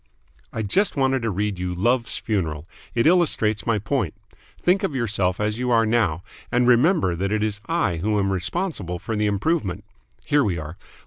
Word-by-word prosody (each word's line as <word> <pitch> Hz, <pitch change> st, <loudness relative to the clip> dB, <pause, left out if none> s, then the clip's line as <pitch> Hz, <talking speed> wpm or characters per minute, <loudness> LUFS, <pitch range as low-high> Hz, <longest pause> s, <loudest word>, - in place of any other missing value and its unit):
"I 110 Hz, -, -3 dB
just 195 Hz, -, +2 dB
wanted 135 Hz, -2 st, +1 dB
to 115 Hz, -, -1 dB
read 100 Hz, -1 st, -2 dB
you 90 Hz, 0 st, -3 dB
'Love's 120 Hz, +5 st, +1 dB
Funeral!' 85 Hz, -8 st, -2 dB, 0.3 s
It 115 Hz, -, +2 dB
illustrates 150 Hz, -, +2 dB
my 115 Hz, -2 st, +2 dB
point. 105 Hz, -, -2 dB, 0.4 s
Think 185 Hz, +3 st, +2 dB
of 190 Hz, -9 st, -2 dB
yourself 100 Hz, -7 st, 0 dB
as 105 Hz, +2 st, -1 dB
you 125 Hz, 0 st, -1 dB
are 115 Hz, -2 st, +4 dB
now, 105 Hz, -7 st, +1 dB, 0.3 s
and 125 Hz, 0 st, +2 dB
remember 125 Hz, -, +4 dB
that 95 Hz, +3 st, -2 dB
it 105 Hz, 0 st, +1 dB
is 105 Hz, -1 st, -2 dB
I 165 Hz, -, 0 dB
who 105 Hz, +5 st, 0 dB
am 100 Hz, -1 st, +1 dB
responsible 95 Hz, -, -2 dB
for 110 Hz, +5 st, -4 dB
the 105 Hz, 0 st, +1 dB
improvement. 105 Hz, -, -1 dB, 0.4 s
Here 145 Hz, -1 st, +3 dB
we 95 Hz, -6 st, 0 dB
are. 80 Hz, +1 st, -7 dB
110 Hz, 185 wpm, -23 LUFS, 95-130 Hz, 0.4 s, are